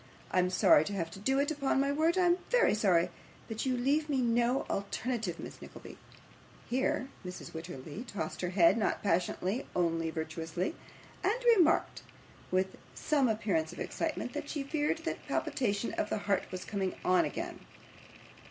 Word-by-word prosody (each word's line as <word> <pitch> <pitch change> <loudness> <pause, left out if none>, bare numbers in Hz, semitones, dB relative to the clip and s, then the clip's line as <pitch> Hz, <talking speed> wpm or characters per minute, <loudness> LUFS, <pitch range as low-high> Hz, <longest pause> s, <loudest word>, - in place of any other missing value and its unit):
I 185 - +3
am 180 0 +3
sorry 180 -4 +6
to 205 - -4
have 165 -4 -2
to 195 - -9
do 265 +7 +1
it, 285 +2 +1
upon 275 -3 +1
my 280 +1 +2
word 320 +5 +2
I 365 - +4
am 350 +1 +4
very - - +4
sorry, 180 -5 +3 0.4
but 225 +3 -3
you 255 -1 +1
leave 290 +5 +1
me 275 -3 +1
no 240 +1 +2
alternative, 210 -1 -2
Miss - - -8
Nickleby.' - - -10 0.7
Here 260 +1 0
Mrs. 180 0 -7
Wititterly 160 - -7
tossed 165 -8 -4
her 180 - -1
head 185 +3 +5
not 215 - 0
passionately, 185 +4 0
only 165 -2 +1
virtuously 160 - -3 0.5
and 440 +7 +1
remarked, 335 -5 +3 0.5
with 185 +1 0 0.2
some 285 -4 +2
appearance 195 -7 0
of - - -10
excitement, - - -3
that - - -5
she 290 -3 -2
feared 295 +1 0
that - - -4
palpitation 210 -4 -1
of 210 - -1
the - - 0
heart 200 -1 +1
was 185 0 -5
coming 195 -3 -2
on 185 0 +5
again. - - -4
210 Hz, 170 wpm, -32 LUFS, 180-270 Hz, 0.7 s, sorry